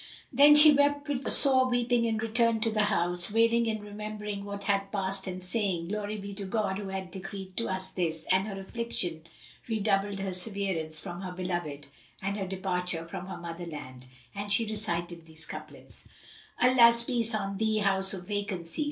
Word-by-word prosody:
Then 290 +3 +7
she 300 0 +9
wept 285 +1 +2
with 275 -2 -2
sore 260 -2 +6
weeping 245 -1 +1
and 220 -1 -1
returned 225 0 +1
to 225 - +1
the 215 -1 +2
house, 175 -2 +1
wailing 230 +1 +3
and 215 -1 -4
remembering 210 -1 -6
what 200 0 -6
had 195 -1 0
passed 195 -1 0
and 185 0 -5
saying, 185 -4 0
"Glory 210 +1 -3
be 200 0 -7
to 200 0 -5
God 195 -1 -1
who 200 - -6
hath 190 -1 -5
decreed 190 0 -8
to 230 - -1
us 190 0 -1
this!" 165 -3 -2
And 190 +2 +2
her 195 -2 -6
affliction 190 -6 -4 0.4
redoubled 205 -3 0
for 195 -1 -3
severance 180 -5 -1
from 175 +1 -7
her 185 -2 -5
beloved 175 -6 -4 0.3
and 195 +1 -3
her 195 -2 -4
departure 180 -3 -2
from 175 +2 -7
her 190 - -6
mother 170 0 -7
land, 130 -5 -9 0.3
and 205 +1 -5
she 225 +3 +3
recited 175 -6 -2
these 160 0 -8
couplets, - - -7 0.5
"Allah's 235 -2 +6
peace 235 -2 +3
on 195 -2 -3
thee, 220 0 +1
House 195 -2 +2
of 180 -1 -9
Vacancy! 200 - -3
200 Hz, 180 wpm, -29 LUFS, 180-220 Hz, 0.5 s, she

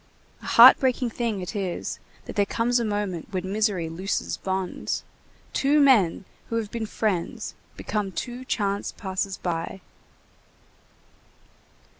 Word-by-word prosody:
A - - -9
heart 245 +3 +9
breaking 255 -2 +1
thing 225 -4 -2
it 180 +5 -6
is 190 -4 -3 0.3
that - - -8
there 205 - +4
comes 240 +3 +1
a - - 0
moment 205 -6 -2
when 190 -1 -3
misery 205 -5 +1
looses 185 +5 -2
bonds! 190 -1 -3 0.5
Two 285 +2 +3
men 220 - +4 0.2
who 230 - -2
have 220 -3 -2
been 225 -2 -3
friends 205 -6 -2 0.2
become 205 -3 -2
two 245 +6 -5
chance 200 -5 -1
passers 190 -1 -3
by. 170 +2 -3
205 Hz, 130 wpm, -25 LUFS, 190-235 Hz, 0.5 s, heart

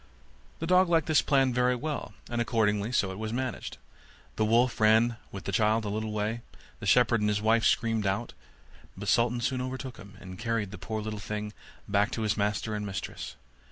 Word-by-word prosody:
The 165 - -4
dog 180 +1 +4
liked 165 -3 +3
this 155 -2 +4
plan 135 -3 +2
very 125 0 +2
well; 150 +4 -4
and 120 0 -1
accordingly 110 -2 +1
so 100 -6 +1
it 95 - -7
was 110 0 -3
managed. 130 0 -4 0.6
The - - +1
wolf 120 +2 +3
ran 110 +2 +4
with 95 - -7
the - - -3
child 110 0 +2
a - - -2
little 110 +1 -2
way; 105 +2 -2 0.4
the - - -5
shepherd 120 -2 +4
and 105 - +2
his 105 0 +1
wife 110 +2 +3
screamed 115 -3 +2
out; 95 0 -2 0.6
but 100 +1 -6
Sultan 120 +2 +2
soon 130 +2 0
overtook 130 0 -5
him, 100 -1 -13
and 90 -1 -10
carried 115 -4 -1
the 105 - -8
poor 110 -1 -4
little 105 -1 -4
thing 105 0 -5 0.3
back 100 +1 +2
to 110 - -2
his 105 -1 +1
master 105 +1 -1
and 105 -1 -2
mistress. 100 -2 -5
110 Hz, 200 wpm, -29 LUFS, 105-125 Hz, 0.6 s, dog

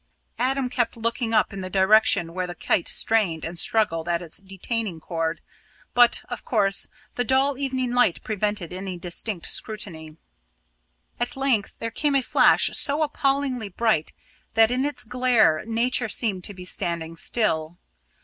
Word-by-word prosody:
Adam 265 +1 +1
kept 245 -2 -1
looking 230 0 -1
up 215 -1 +2
in 195 - -5
the 185 - -5
direction 190 -3 +3
where 185 0 -2
the 175 - -7
kite 170 - 0
strained 195 -8 +1
and 170 +1 -5
struggled 170 -7 +1
at 170 0 +1
its 170 -1 -7
detaining 195 -1 -3
cord, 165 0 -3 0.5
but, 245 -1 +4
of 245 - -6
course, 200 -4 +1 0.2
the 245 - -1
dull 265 +3 +2
evening 260 -2 -2
light 245 -8 +3
prevented 205 -4 -2
any 185 0 -5
distinct 175 +2 -3
scrutiny. 165 -8 -3 1.0
At 240 +2 -2
length 260 -7 0
there 230 - -4
came 290 +4 0
a 270 - +3
flash - - +4
so 295 +2 +1
appallingly 275 -6 0
bright 195 -5 0 0.4
that 225 +1 +5
in 255 +2 +1
its 290 - -2
glare 240 -9 +3
Nature 235 +1 +1
seemed 200 -5 -1
to 205 - -7
be 180 -1 -9
standing 170 -2 -3
still. 165 -4 -1
215 Hz, 155 wpm, -24 LUFS, 175-245 Hz, 1.0 s, that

